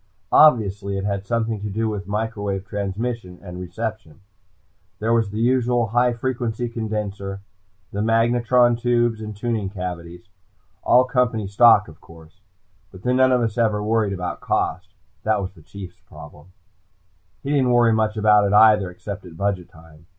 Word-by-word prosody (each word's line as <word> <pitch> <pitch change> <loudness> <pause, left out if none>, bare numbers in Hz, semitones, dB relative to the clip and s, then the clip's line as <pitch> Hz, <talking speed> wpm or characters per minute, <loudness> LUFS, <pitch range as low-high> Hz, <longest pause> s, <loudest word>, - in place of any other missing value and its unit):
Obviously, 100 -9 +4
it 95 - -3
had 100 -1 -3
something 115 -2 -1
to 105 - -4
do 110 +3 -1
with 105 -2 -4
microwave 100 -2 -3
transmission 100 -1 -4
and 90 -1 -8
reception. 95 -1 -6 0.8
There 110 +4 0
was 115 -3 +1
the 105 +2 -5
usual 120 -1 +2
high 120 +2 +2
frequency 120 -1 -3
condensor, 105 -4 -4 0.5
the 100 - -2
magnatron 120 +2 +3
tubes, 120 -2 +1
the 110 -1 -6
tuning 105 -1 -3
cavities. 90 -2 -7 0.5
All 125 +1 +5
company 125 -4 0
stock, 105 +1 +5
of 80 -1 -15
course. 80 +3 -17 0.5
But 95 - -14
then 125 0 +1
none 130 0 +4
of 125 -1 +3
us 115 -1 -2
ever 105 -3 +1
worried 105 -2 +1
about 90 -2 -5
cost. - - -2 0.3
That 110 -1 +1
was 95 -1 -5
the 85 - -18
Chief's 95 +2 -11
problem. 75 +2 -13 1.0
He 140 - -3
didn't 135 -3 +2
worry 120 -2 +4
much 110 0 0
about 105 -1 +4
it 100 - -1
either, 105 -3 +5
except 100 +2 -8
at 85 -2 -12
budget 100 -2 -2
time. 80 -2 -18
105 Hz, 160 wpm, -22 LUFS, 95-115 Hz, 1.0 s, All